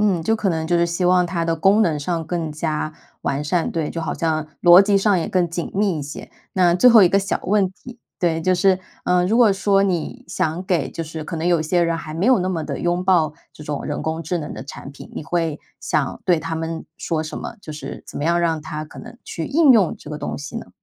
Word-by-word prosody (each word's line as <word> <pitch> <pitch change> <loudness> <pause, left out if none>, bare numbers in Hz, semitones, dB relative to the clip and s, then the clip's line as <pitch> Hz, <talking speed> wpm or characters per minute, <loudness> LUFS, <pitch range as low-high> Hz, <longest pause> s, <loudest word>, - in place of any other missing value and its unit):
嗯， 195 -6 +2
就 225 +7 +2
可 205 -3 -1
能 160 -2 -1
就 170 +1 +1
是 170 - +3
希 170 +2 -2
望 180 0 +4
它 170 -1 -2
的 165 0 +1
功 195 +6 +4
能 155 -5 +1
上 165 +2 -2
更 160 -2 -3
加 155 0 -2 0.3
完 140 +2 -1
善， 165 +3 0
对， 160 -3 -2
就 165 - -4
好 160 - -3
像 155 -2 -1 0.2
逻 175 +2 +9
辑 200 0 +3
上 195 -2 +3
也 165 - -2
更 180 -3 +1
紧 170 0 -4
密 195 -5 +1
一 - - -4
些。 145 - -8 0.2
那 180 -2 +3
最 180 +8 +6
后 230 -4 +8
一 180 - +6
个 195 - +3
小 195 -1 -2
问 200 -1 +2
题， 245 +5 -13 0.2
对， 165 -2 +1
就 185 +2 +2
是 185 +1 +3 0.3
呃， 180 0 +2
如 220 +4 +2
果 230 -5 +6
说 195 0 +2
你 195 +7 -2
想 180 0 -2
给 175 -8 0
就 165 - -5
是 155 -1 -7
可 170 - -6
能 160 +1 -3
有 170 -2 +3
一 155 - -2
些 175 +2 +2
人 165 -1 0
还 155 -1 -7
没 175 +5 -1
有 255 -3 +5
那 185 0 -1
么 165 -4 -2
地 - - -4
拥 175 +1 -1
抱 165 -5 +3 0.2
这 150 - -12
种 145 -1 -4
人 145 - -3
工 160 +1 -3
智 175 +3 -2
能 150 - -6
的 - - -7
产 140 0 -9
品， - - -12
你 - - -5
会 165 -1 -1 0.2
想 - - -1
对 175 -3 +3
他 165 +1 -4
们 160 0 -4
说 160 -2 -2
什 155 - -5
么？ 230 - -6
就 155 - -8
是 150 - -8
怎 - - -10
么 - - -3
样 170 +2 +2
让 165 -2 0
他 155 0 -5
可 - - -11
能 - - -12
去 165 - -5
应 290 -1 +5
用 200 -8 +3
这 - - -12
个 150 - -5
东 - - -4
西 150 +11 -7
呢？ 230 - -7
170 Hz, 285 characters per minute, -21 LUFS, 160-185 Hz, 0.3 s, 逻